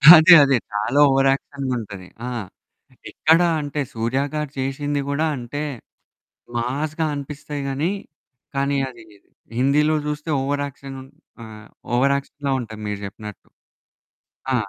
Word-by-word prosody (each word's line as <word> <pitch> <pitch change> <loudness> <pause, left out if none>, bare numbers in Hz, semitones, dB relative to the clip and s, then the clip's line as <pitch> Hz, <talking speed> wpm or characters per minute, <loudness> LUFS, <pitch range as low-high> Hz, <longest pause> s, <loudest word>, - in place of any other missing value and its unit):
అదే 160 +3 +9
అదే. 135 -2 +4 0.2
చాలా 105 +7 +1
ఓవరాక్షన్‌గుంటది. 135 -7 -1 0.2
ఆ! - - -3 0.8
ఎక్కడ 160 +2 +4 0.2
అంటే 145 0 -4
సూర్య 115 +4 -1
గారు 150 -2 -2
చేసింది 145 +2 -1
గూడా 150 +3 +1
అంటే 130 +5 -4 0.9
మాస్‌గా 150 +6 -1
అనిపిస్తాయి 145 0 -5
గాని, 150 +7 0 0.6
కానీ 140 +1 +1
అది 120 -3 -13 0.5
హిందీలో 150 +4 +3
చూస్తే 150 +2 -4
ఓవరాక్షన్, 140 -1 -3
ఉన్ 135 - -14 0.3
ఆహ్, 110 -1 -11 0.3
ఓవరాక్షన్‌లా 140 +2 0
ఉంటది 110 -2 -8
మీరు 105 -1 -3
చెప్పినట్టు. 105 +1 -9 1.1
ఆ! - - +2
140 Hz, 110 wpm, -22 LUFS, 125-145 Hz, 1.1 s, అదే